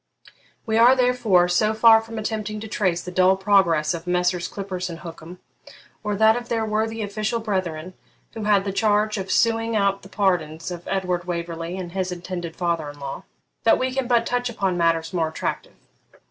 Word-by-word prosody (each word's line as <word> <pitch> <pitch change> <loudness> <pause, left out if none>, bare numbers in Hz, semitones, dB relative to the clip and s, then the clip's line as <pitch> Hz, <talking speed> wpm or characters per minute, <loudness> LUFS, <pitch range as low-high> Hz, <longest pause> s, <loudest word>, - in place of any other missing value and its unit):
We 220 -1 0
are, 245 +3 +7
therefore, 245 -8 +3
so 215 +5 +1
far 225 0 +7
from 225 0 -9
attempting 215 -1 -3
to 220 - -6
trace 185 -5 0
the 180 - -7
dull 185 +1 +4
progress 190 -6 +3
of 170 +1 -7
Messrs. 180 0 0
Clippurse 185 -2 -5
and 170 0 -8
Hookem, 165 0 -10 0.7
or 210 -1 -1
that 220 +2 +5
of 240 0 -5
their 225 -1 0
worthy 220 +1 -1
official 215 +3 -2
brethren 185 -5 -3 0.4
who 220 -2 -5
had 205 -2 +3
the 195 - -1
charge 210 0 +1
of 190 0 -5
suing 225 +1 +1
out 200 -1 +1
the 195 - -14
pardons 175 -5 -1
of 175 -1 -8
Edward 180 -2 -1
Waverley 170 0 -4
and 180 -2 -6
his 185 0 -2
intended 175 -1 -6
father 170 -4 -1
in 145 - -11
law, 140 +6 -7 0.4
that 225 - +5
we 255 0 -1
can 265 -2 -1
but 235 -2 +2
touch 245 0 -1
upon 195 -5 -1
matters 165 -1 +1
more 165 -3 0
attractive. 160 - -4
190 Hz, 190 wpm, -23 LUFS, 175-220 Hz, 0.7 s, are